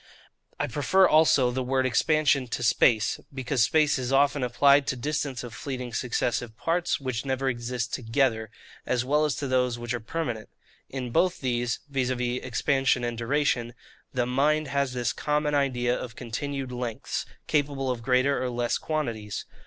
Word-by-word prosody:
I - - +1
prefer 165 +9 +3
also 155 -6 +4
the 130 +1 -2
word 130 +1 0
expansion 140 +1 +2
to 125 - -3
space, 115 -1 +3
because 130 -1 -1
space 150 +2 +3
is 125 0 -3
often 140 +1 +3
applied 140 +3 +4
to - - 0
distance 140 0 -2
of 120 -2 -8
fleeting 125 -3 -5
successive 120 -1 -1
parts, 170 +1 0
which 130 -4 -3
never 135 0 -1
exist 120 -1 -2
together, 115 -2 0 0.3
as 125 -1 0
well 150 +3 +2
as 150 - 0
to 145 -1 -3
those 125 -2 +1
which 120 0 -4
are 120 - -2
permanent. 120 -2 -4 0.4
In 125 -3 -5
both 180 +8 +2
these 120 -2 -1
(viz. 135 -3 -1
expansion 125 +1 0
and 120 -1 -2
duration) 120 -1 0 0.4
the 125 -1 0
mind 145 +4 +1
has 140 -1 0
this 120 -2 -1
common 150 0 0
idea 125 -4 +1
of 120 -2 -6
continued 135 +2 -4
lengths, 120 -3 -4 0.2
capable 140 -3 0
of 120 -2 -4
greater 130 +3 +2
or 125 - -1
less 120 -1 -1
quantities. 115 -10 -3
130 Hz, 160 wpm, -27 LUFS, 120-140 Hz, 0.4 s, also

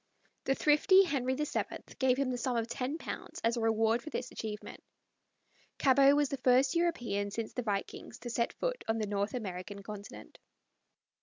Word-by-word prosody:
The 270 - +2
thrifty 310 +7 +5
Henry 260 -7 0
VII 300 +2 -1 0.4
gave 255 -1 +3
him 270 -2 0
the 250 - -2
sum 245 0 0
of 230 - 0
£10 255 +6 -5
as 230 +1 +2
a 235 - -2
reward 225 +1 +2
for 310 - -8
this 250 -4 -4
achievement. 215 -1 -7 0.9
Cabot 275 +1 +5
was 290 -2 +2
the 275 - -3
first 255 +1 +4
European 240 -13 0
since 220 +2 -5
the 250 - -2
vikings 205 -4 -4
to 240 - -5
set 235 0 0
foot - - -3
on 225 0 +1
the 215 - -1
North 205 +2 -2
American 200 -2 -5
continent. 205 0 -10
245 Hz, 170 wpm, -32 LUFS, 220-275 Hz, 0.9 s, thrifty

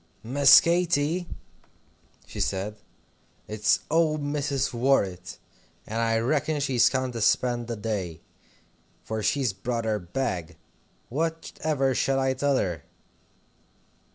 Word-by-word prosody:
"Miss 135 +4 +7
Katy," 170 0 +1 1.0
she - - -9
said, 100 +2 -2 0.7
"it's 105 0 +1
old 155 -2 +2
Mrs. 140 -2 -1
Worrett, 100 -8 0 0.5
and 110 +2 -4
I 115 -1 +2
reckon's 145 +5 0
she's 130 -4 +3
come 130 -1 -1
to 115 -2 -5
spend 120 +2 +1
the 120 - -3
day, 100 -6 -4 0.8
for 110 0 -4
she's 130 -1 0
brought 115 +4 -3
her 110 -1 0
bag. 90 -4 -4 0.5
What 160 +5 -3
ever 135 -4 +1
shall 135 +2 +1
I 135 0 +1
tell 140 +1 +1
her?" 85 - -2
125 Hz, 120 wpm, -26 LUFS, 110-145 Hz, 1.0 s, Miss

